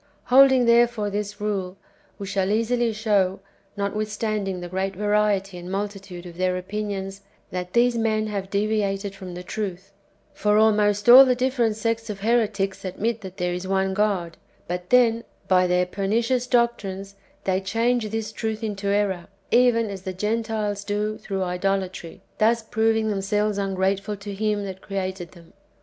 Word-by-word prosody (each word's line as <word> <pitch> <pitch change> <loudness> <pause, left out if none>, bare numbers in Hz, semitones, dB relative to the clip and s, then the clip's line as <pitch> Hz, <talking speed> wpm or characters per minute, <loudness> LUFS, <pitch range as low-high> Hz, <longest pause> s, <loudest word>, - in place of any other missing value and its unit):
Holding, 265 -2 +7
therefore, 235 -3 +3
this 205 0 -4
rule, 195 -3 -3 0.4
we 200 - -6
shall 195 -1 -1
easily 230 +2 +1
show, 205 -3 +1 0.4
notwithstanding 210 -1 -2
the 175 - -6
great 190 +2 -2
variety 205 -2 +1
and 175 +1 -8
multitude 195 -3 -5
of 170 -1 -10
their 185 0 +1
opinions, 195 0 -4 0.3
that 180 0 -5
these 240 0 +3
men 220 -1 +1
have 200 -3 -4
deviated 200 -1 -1
from 185 -2 -9
the 180 - -7
truth; 195 -1 -5 0.4
for 210 0 +2
almost 210 -1 +3
all 250 +3 +11
the 255 -2 +2
different 245 -3 +1
sects 230 +1 -2
of 200 -2 -5
heretics 210 -4 0
admit 220 +5 -2
that 190 -1 -9
there 180 -1 -1
is 180 +1 -5
one 190 0 +1
God; 190 -5 0 0.3
but 180 0 -4
then, 235 -2 +4 0.2
by 185 -1 +4
their 180 0 +2
pernicious 230 +7 0
doctrines, 200 -6 0 0.3
they 190 0 0
change 230 +3 0
[this 220 0 -3
truth 220 0 -4
into 205 -2 -3
error], 200 -3 0 0.2
even 235 -3 +4
as 195 -2 -7
the 190 0 -5
Gen 210 +5 -1
tiles 210 -2 -3
do 210 +1 -2
through 195 -2 -3
idolatry, 185 -1 -3
— - - -39
thus 230 +1 +3
proving 220 0 +1
themselves 205 +1 0
ungrate 195 0 0
ful 205 +1 -5
to 200 0 -7
Him 210 0 -1
that 190 -1 -7
created 190 -4 -4
them. 170 -2 -17
205 Hz, 165 wpm, -24 LUFS, 190-220 Hz, 0.4 s, all